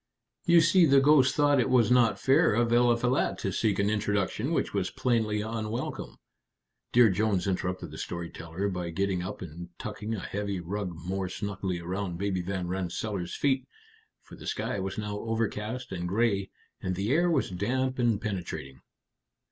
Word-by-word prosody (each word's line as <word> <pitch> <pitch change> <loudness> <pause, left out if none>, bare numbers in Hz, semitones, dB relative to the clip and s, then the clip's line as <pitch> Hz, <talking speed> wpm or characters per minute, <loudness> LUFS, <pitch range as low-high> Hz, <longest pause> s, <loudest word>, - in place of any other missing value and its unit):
You 170 -1 +6
see, 170 +1 +5
the 140 -1 +6
ghost 135 -2 +5
thought 145 -2 +4
it 120 - +2
was 125 -2 +4
not 125 -2 +4
fair 135 -5 +4
of 120 0 +2
Eliphalet 120 +1 +2
to 95 - -2
seek 105 +2 +1
an 100 +1 +2
introduction 105 -2 0
which - - 0
was - - 0
plainly 110 -4 0
unwelcome." 110 +2 -4 0.7
Dear 120 -3 +6
Jones 105 0 +1
interrupted 95 -1 -2
the - - -8
story 85 -1 -5
teller 85 +4 -4
by 90 -3 -3
getting 95 +1 -1
up 95 +1 -5
and 85 +1 -8
tucking 105 +1 -4
a - - -4
heavy 100 0 -3
rug 90 +1 -4
more 95 0 -2
snugly 95 -2 -3
around 90 +1 -3
Baby 95 -1 -1
Van 90 0 -3
Rensselaer's 90 +1 -3
feet, 135 -2 +1 0.6
for - - -13
the - - -10
sky 105 - -2
was 95 0 -4
now 105 -1 -3
overcast 115 +2 -3
and 90 -2 -3
gray, 100 -1 +1 0.3
and 95 0 -2
the 100 +5 -1
air 175 +5 +3
was 145 - +1
damp 130 +8 -1
and 115 -4 +2
penetrating. 90 - -5
105 Hz, 170 wpm, -28 LUFS, 95-120 Hz, 0.7 s, You